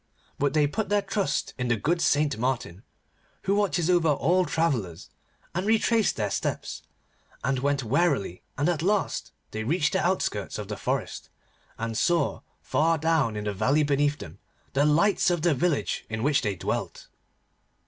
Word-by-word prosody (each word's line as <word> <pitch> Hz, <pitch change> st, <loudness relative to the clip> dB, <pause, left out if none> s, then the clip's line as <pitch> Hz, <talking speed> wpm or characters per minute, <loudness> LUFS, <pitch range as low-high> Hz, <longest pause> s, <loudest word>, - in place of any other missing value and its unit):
But 145 Hz, +1 st, +1 dB
they 150 Hz, -1 st, +4 dB
put 200 Hz, +8 st, -2 dB
their 205 Hz, -1 st, +2 dB
trust 200 Hz, -9 st, -1 dB
in 125 Hz, -, -1 dB
the 120 Hz, -, +2 dB
good 165 Hz, +10 st, 0 dB
Saint 145 Hz, 0 st, +2 dB
Martin, 120 Hz, -7 st, -2 dB, 0.6 s
who 195 Hz, -, +1 dB
watches 195 Hz, -5 st, +1 dB
over 175 Hz, -2 st, +3 dB
all 175 Hz, +6 st, +2 dB
travellers, 120 Hz, -, -1 dB, 0.4 s
and 180 Hz, +2 st, -1 dB
retraced 225 Hz, -1 st, +3 dB
their 105 Hz, -3 st, -2 dB
steps, -, -, -3 dB, 0.6 s
and 135 Hz, 0 st, 0 dB
went 140 Hz, 0 st, 0 dB
warily, 130 Hz, -, 0 dB, 0.2 s
and 145 Hz, -, +1 dB
at 170 Hz, -3 st, 0 dB
last 200 Hz, +3 st, 0 dB, 0.2 s
they 110 Hz, -, -3 dB
reached 155 Hz, +6 st, +1 dB
the 190 Hz, -, +1 dB
outskirts 175 Hz, -, -1 dB
of 105 Hz, -1 st, -6 dB
the 105 Hz, -, -3 dB
forest, -, -, -3 dB, 0.5 s
and 115 Hz, 0 st, -3 dB
saw, 170 Hz, +8 st, +1 dB, 0.2 s
far 165 Hz, +1 st, +2 dB
down 155 Hz, -7 st, +1 dB
in 105 Hz, -, -3 dB
the 105 Hz, -1 st, -2 dB
valley 130 Hz, +10 st, +2 dB
beneath 145 Hz, 0 st, +1 dB
them, 85 Hz, +4 st, -10 dB, 0.3 s
the 140 Hz, +2 st, +3 dB
lights 170 Hz, +7 st, +3 dB
of 175 Hz, -3 st, 0 dB
the 170 Hz, -2 st, +4 dB
village 160 Hz, +2 st, 0 dB
in 110 Hz, +1 st, -3 dB
which 145 Hz, 0 st, +3 dB
they 105 Hz, -4 st, -1 dB
dwelt. 85 Hz, -, -4 dB
145 Hz, 170 wpm, -26 LUFS, 115-175 Hz, 0.6 s, they